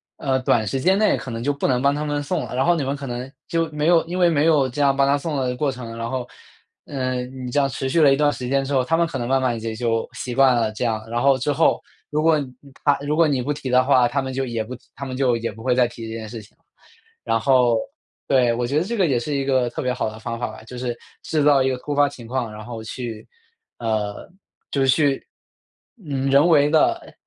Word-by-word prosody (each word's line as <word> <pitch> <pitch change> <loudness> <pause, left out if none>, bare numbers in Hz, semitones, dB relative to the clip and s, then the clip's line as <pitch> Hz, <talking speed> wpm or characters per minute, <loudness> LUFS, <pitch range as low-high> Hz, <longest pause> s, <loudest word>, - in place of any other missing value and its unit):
呃， 130 -2 0
短 120 -3 +2
时 120 +6 -2
间 185 +7 +3
内 215 +1 +3
可 - - -7
能 115 0 -4
就 145 - +1
不 140 - -1
能 125 -1 +1
帮 140 0 +3
他 150 +1 -3
们 145 -1 -2
送 165 +3 -2
了。 - - -7
然 130 - +1
后 175 - +4
你 150 -5 -1
们 140 +2 -1
可 140 - -7
能 125 +1 -5 0.2
就 165 -1 0
没 150 +1 -1
有 170 -1 +5
因 175 +2 -4
为 175 -2 +4
没 155 -1 +2
有 150 -5 +4
这 145 +4 -3
样 140 -1 +4
帮 140 - +3
他 140 +1 +3
送 155 +1 -4
的 130 -2 -1
过 145 +2 0
程， 120 -3 -7
然 115 0 -4
后， 130 -2 -3 0.6
呃， 130 -2 -2
你 125 -1 -7
这 145 - +2
样 135 - +3
持 135 0 -3
续 165 - +2
了 145 -3 +6
一 - - +3
段 145 0 +3
时 125 - -5
间 135 +1 +1
之 140 +1 -4
后， 130 - +3
他 165 +6 +1
们 170 - +3
可 165 -5 -5
能 120 - -3
慢 135 +1 +2
慢 120 -3 0
也 110 0 -4
就 115 -1 -1
习 125 - -5
惯 130 0 +5
了 115 -2 +1
这 110 +3 -3
样。 110 -2 -1
然 120 +1 -1
后 135 0 +4
之 140 +3 -1
后， 160 +3 +2 0.3
如 150 +1 0
果 160 -2 +4 0.5
他 145 -1 +4
如 150 +2 0
果 165 - +5
你 135 -4 0
不 145 +4 -2
提 140 -2 -4
的 125 0 +4
话， 130 -2 +4
他 140 +3 -1
们 130 0 -4
就 135 0 -1
也 115 -2 -2
不 120 +4 -8
提 125 - -11
他 - - -7
们 130 -1 -5
就 130 -3 +2
也 115 -1 -3
不 110 - -12
会 125 +1 +1
再 125 -1 +4
提 115 -1 -7
这 - - -6
件 110 -1 -7
事 115 -1 -7
情 105 - -19
了。 - - -41 0.6
然 115 0 +2
后 125 -1 +3 0.5
对， 125 -3 +3
我 120 +1 -1
觉 140 +4 -1
得 - - 0
这 235 +6 -3
个 190 - +3
也 135 -7 +1
是 145 +5 -4
一 140 - 0
个 130 -3 +2
特 - - -5
别 125 - 0
好 115 - -2
的 110 - -10
方 115 +1 -5
法 120 - -1
吧， - - -10
就 125 +3 -10
是 120 -1 -3 0.3
制 155 -2 0
造 145 -2 +5
一 130 - +2
个 130 - -1
突 145 +3 -5
发 145 0 +4
情 120 -4 -12
况， 120 -2 -2
然 105 +1 -9
后 115 -2 -7
去 115 -1 -6 0.5
呃， 110 -3 -2 0.4
就 140 - 0
是 135 - +3
去， 135 +1 +2 0.8
嗯， 135 -2 -1
人 140 +4 +6
为 150 -4 +5
地 155 0 +1
130 Hz, 300 characters per minute, -22 LUFS, 120-145 Hz, 0.8 s, 了